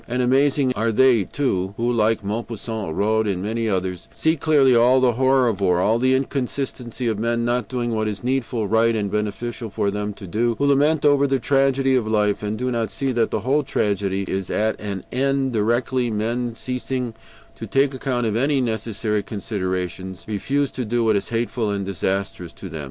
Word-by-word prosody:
And 125 +1 0
amazing 135 +1 +3
are 115 -1 0
they 120 -3 +4
too, 95 -8 -1
who, 120 +1 0
like 110 -1 +1
Maupassant, 110 -3 -4
Rod, 110 +1 +1
and 95 -2 -1
many 115 +2 -1
others, 95 -2 -2
see 160 +1 +1
clearly 140 -4 +4
all 125 +3 +5
the 130 -1 +4
horror 130 +1 +3
of 105 -4 -1
war, 90 -2 +3
all 110 +5 +2
the 130 +1 +3
inconsistency 130 -2 -3
of 110 -2 -1
men 115 +1 0
not 120 -2 0
doing 120 0 -2
what 110 -1 0
is 105 0 -4
needful, 125 -4 -1
right, 115 +2 +3
and 100 -2 -2
beneficial 110 +2 -3
for 100 0 -1
them 105 +1 -3
to 100 - -10
do; 115 +5 0
who 140 - +1
lament 145 +2 +3
over 140 -1 +4
the 135 0 +2
tragedy 135 0 +2
of 125 -4 +1
life, 105 -2 +1
and 105 +1 -3
do 125 +2 -1
not 115 -2 -1
see 135 -1 -2
that 120 -2 +1
the - - -2
whole 140 +4 +2
tragedy 100 -8 -1
is 95 -1 -3
at 110 +1 0
an 100 -3 -4
end 135 0 0
directly 120 +3 +1
men, 115 +2 -2
ceasing 125 0 -3 0.4
to - - -7
take 135 0 +2
account 130 -2 -1
of 110 -1 0
any 140 +5 +2
unnecessary 110 -3 -1
considerations, 95 -3 -4
refuse 135 +7 -1
to 125 - -4
do 120 +1 0
what 110 -1 +3
is 100 - -1
hateful 115 -1 -1
and 100 -1 -2
disastrous 95 -2 -3
to - - -9
them. 80 - -6
115 Hz, 195 wpm, -22 LUFS, 105-130 Hz, 0.4 s, all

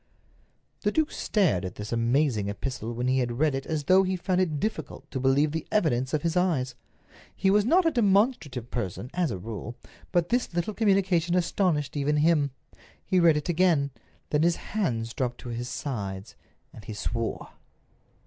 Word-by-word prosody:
The - - +1
duke 315 -1 +1
stared 180 - +1
at 90 - -5
this 105 0 -7
amazing 115 -2 +1
epistle 115 +2 -4
when 120 +2 -2
he 130 +1 +2
had 120 -2 -1
read 150 0 +2
it 135 0 -4
as 155 -2 -2
though 185 +6 +5
he 190 0 0
found 185 0 0
it 155 -5 0
difficult 160 -8 -4
to 130 - -3
believe 135 +3 +3
the 160 0 -4
evidence 130 -10 +1
of 155 - -1
his 165 0 0
eyes. 160 -9 +1 0.6
He 190 0 +2
was 205 +1 +4
not 345 +8 +4
a 330 - +4
demonstrative 200 - +1
person, 120 +2 -4
as 175 -3 +1
a - - -3
rule, 115 +4 -6 0.4
but 175 -2 +1
this 245 +1 0
little 175 +5 -1
communication 190 -5 +2
astonished 170 -5 0
even 145 +1 +1
him. 150 -2 +3 0.6
He 185 - +2
read 165 -3 +5
it 150 - -3
again. 165 -5 +2 0.4
Then 150 - +2
his 170 +1 +3 0.2
hands 115 - -1
dropped 125 -2 -2
to 125 - -7
his 120 +1 -4
sides, 100 -8 -5 0.4
and 110 - -11
he 105 +1 -7
swore. 115 +3 -3
150 Hz, 180 wpm, -27 LUFS, 120-180 Hz, 0.6 s, though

